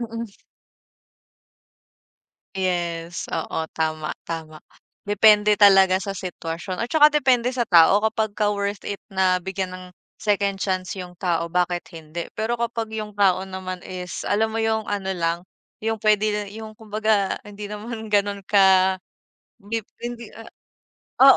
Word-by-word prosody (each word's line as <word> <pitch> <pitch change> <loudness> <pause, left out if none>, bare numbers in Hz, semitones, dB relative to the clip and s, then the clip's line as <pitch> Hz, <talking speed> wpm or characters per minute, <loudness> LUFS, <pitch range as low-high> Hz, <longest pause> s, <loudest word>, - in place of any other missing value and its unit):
Mm. 230 -2 -5 2.2
Yes, 175 -2 -2
oo, 160 - -2
tama, 155 -1 -2
tama. 160 -2 -7 0.4
Depende 210 0 +5
talaga 195 -2 +7
sa 195 0 -4
sitwasyon 180 0 -5
at 230 - -1
tsaka 300 +2 +6
depende 255 -4 +3
sa 245 -3 -1
tao. 175 +3 +6
Kapagka 215 -1 0
worth 200 0 -3
it 200 - -5
na 185 -1 +2
bigyan 190 0 -4
ng 185 0 -8 0.4
second 200 -1 +1
chance 185 -1 -1
'yung 180 -2 -8
tao, 170 -2 -1
bakit 180 0 0
hindi? 165 0 -7
Pero 225 +2 0
kapag 230 -2 -3
'yung 215 -1 -4
tao 195 -2 +2
naman 185 -1 -6
is 180 -1 -6
alam 220 +2 0
mo 225 - 0
'yung 220 -1 0
ano 195 -2 -2
lang, 170 -2 0 0.4
'yung 225 0 -1
pwede 210 0 +2
yung 220 -1 -9
kumbaga 215 -2 0
hindi 205 0 -8
naman 220 +2 -6
ganoon 205 -1 +1
ka 190 -2 +5 0.6
dip 215 +1 -5 0.2
hindi, 235 -2 -6 0.9
ah 270 0 +9
200 Hz, 135 wpm, -23 LUFS, 185-220 Hz, 2.2 s, ah